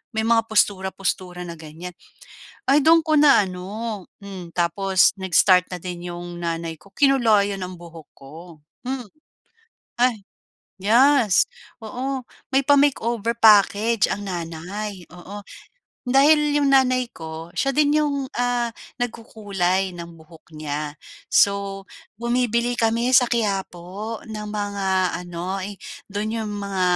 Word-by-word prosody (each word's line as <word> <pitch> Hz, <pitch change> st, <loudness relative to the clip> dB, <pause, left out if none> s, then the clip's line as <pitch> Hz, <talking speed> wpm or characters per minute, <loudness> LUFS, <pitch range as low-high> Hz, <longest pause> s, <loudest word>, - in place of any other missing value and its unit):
May 220 Hz, -, 0 dB
mga 225 Hz, 0 st, +2 dB
postura-postura 190 Hz, -3 st, -1 dB
na 170 Hz, -2 st, -8 dB
ganyan. 165 Hz, +3 st, -9 dB, 0.8 s
Ay 280 Hz, +2 st, +4 dB
do'n 325 Hz, +1 st, +5 dB
ko 310 Hz, -, +2 dB
na 285 Hz, -9 st, +6 dB
ano, 200 Hz, +3 st, -6 dB, 0.2 s
hmm, 190 Hz, -4 st, -9 dB
tapos 180 Hz, +2 st, +2 dB
nag-start 185 Hz, -1 st, +3 dB
na 180 Hz, -, -5 dB
din 175 Hz, 0 st, -7 dB
'yong 175 Hz, 0 st, -7 dB
nanay 165 Hz, -1 st, -3 dB
ko, 195 Hz, +6 st, -20 dB
kinulayan 215 Hz, -8 st, +2 dB
ang 180 Hz, -1 st, -6 dB
buhok 165 Hz, -3 st, -12 dB
ko, 135 Hz, +2 st, -13 dB, 0.5 s
hmm, 255 Hz, -2 st, -4 dB, 0.9 s
ay 240 Hz, -4 st, +2 dB, 0.6 s
yes, 235 Hz, 0 st, +4 dB, 0.4 s
oo, 260 Hz, +3 st, -4 dB, 0.2 s
may 270 Hz, +1 st, +1 dB
pa-makeover 240 Hz, -5 st, +2 dB
package 215 Hz, 0 st, +4 dB
ang 205 Hz, -, -3 dB
nanay, 180 Hz, +2 st, -5 dB
oo. 200 Hz, +3 st, -10 dB, 0.6 s
Dahil 295 Hz, +4 st, +4 dB
'yong 285 Hz, -, +2 dB
nanay 255 Hz, -2 st, +3 dB
ko, 160 Hz, +1 st, -8 dB
siya 275 Hz, -, 0 dB
din 295 Hz, +1 st, +2 dB
'yong, 285 Hz, -3 st, 0 dB
ah, 245 Hz, -1 st, -1 dB, 0.2 s
nagkukulay 195 Hz, -6 st, -2 dB
ng 170 Hz, -1 st, -10 dB
buhok 160 Hz, +1 st, -18 dB
niya, 150 Hz, -1 st, -5 dB, 0.3 s
so 200 Hz, -1 st, +2 dB, 0.3 s
bumibili 240 Hz, 0 st, 0 dB
kami 235 Hz, +2 st, +1 dB
sa 245 Hz, -1 st, +5 dB
Quiapo 200 Hz, -1 st, -3 dB
ng 215 Hz, -1 st, -6 dB
mga 195 Hz, -3 st, -1 dB
ano, 180 Hz, +2 st, -5 dB, 0.5 s
do'n 215 Hz, +2 st, -3 dB
'yong 215 Hz, -1 st, -4 dB
mga 200 Hz, -2 st, -3 dB
205 Hz, 120 wpm, -22 LUFS, 180-240 Hz, 0.9 s, na